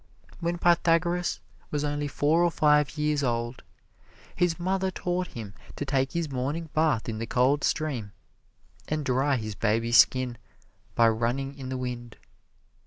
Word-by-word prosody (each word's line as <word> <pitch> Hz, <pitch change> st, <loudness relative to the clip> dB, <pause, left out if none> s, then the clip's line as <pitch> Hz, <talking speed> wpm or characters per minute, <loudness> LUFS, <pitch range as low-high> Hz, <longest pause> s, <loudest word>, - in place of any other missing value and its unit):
When 170 Hz, 0 st, -1 dB
Pythagoras 175 Hz, 0 st, +2 dB, 0.3 s
was 150 Hz, -1 st, -2 dB
only 145 Hz, 0 st, -1 dB
four 150 Hz, +4 st, +2 dB
or 175 Hz, -, +4 dB
five 150 Hz, -2 st, +2 dB
years 150 Hz, -1 st, +1 dB
old, 120 Hz, 0 st, -2 dB, 0.7 s
his 175 Hz, -1 st, +1 dB
mother 190 Hz, +2 st, 0 dB
taught 180 Hz, -1 st, -2 dB
him 105 Hz, -4 st, -7 dB, 0.2 s
to 145 Hz, -, -4 dB
take 135 Hz, -1 st, 0 dB
his 170 Hz, -2 st, -1 dB
morning 145 Hz, +5 st, -3 dB
bath 155 Hz, -7 st, +1 dB
in 110 Hz, -2 st, -3 dB
the 115 Hz, -, -4 dB
cold 130 Hz, +5 st, +2 dB
stream, 135 Hz, -10 st, -1 dB, 0.8 s
and 155 Hz, -1 st, -2 dB
dry 135 Hz, +2 st, +2 dB
his 110 Hz, -3 st, -4 dB
baby 115 Hz, +3 st, 0 dB
skin 125 Hz, 0 st, +4 dB, 0.6 s
by 115 Hz, -, +5 dB
running 120 Hz, +5 st, 0 dB
in 135 Hz, -2 st, -7 dB
the 130 Hz, -, -3 dB
wind. 120 Hz, -2 st, -6 dB
140 Hz, 150 wpm, -27 LUFS, 120-165 Hz, 0.8 s, by